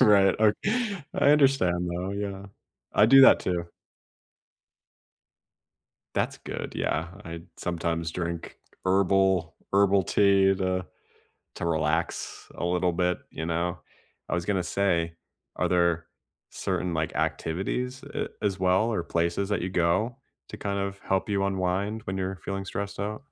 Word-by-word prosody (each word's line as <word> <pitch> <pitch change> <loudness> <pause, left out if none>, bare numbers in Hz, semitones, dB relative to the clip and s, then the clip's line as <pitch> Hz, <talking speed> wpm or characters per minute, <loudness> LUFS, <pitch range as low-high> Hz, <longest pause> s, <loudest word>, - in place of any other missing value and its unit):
Right, 100 -2 +6
o 110 -1 +5 0.6
I - - +4
understand, 130 -12 +3
though, 90 +2 -3
yeah. 100 -1 -4 0.5
I 105 - +5
do 135 +3 +8
that - - +8
too. 85 -2 -2 2.5
That's - - -1
good, - - -6
yeah, 80 +2 -1 0.2
I 85 0 -7
sometimes 85 -1 -2
drink 85 0 -4 0.3
herbal 95 -2 +2 0.2
herbal 100 0 +4
tea 95 +1 +4
to 95 -1 -1 0.7
to - - -4
relax 80 +1 -1
a - - -3
little 90 0 +1
bit, 90 +1 +1
you 80 - -5
know? 85 +1 -1 0.5
I - - -1
was 90 -1 -1
gonna 95 -1 0
say, 85 -3 0 0.4
are 90 - +1
there 85 -2 +2 0.4
certain, 90 -1 -2
like, 80 -1 -1
activities 125 +10 -2
a - - -2
as 100 -2 0
well 95 +4 +3
or 105 - 0
places 85 +4 0
that 105 - 0
you 90 - -1
go 90 +8 +1 0.3
to - - -8
kind 100 -1 -2
of 100 0 -3
help 95 +1 -1
you 100 -1 +1
unwind 100 +3 -1
when 95 - -3
you're 95 0 -2
feeling 95 0 -3
stressed 100 +1 -5
out? 105 +5 -3
95 Hz, 140 wpm, -27 LUFS, 85-100 Hz, 2.5 s, do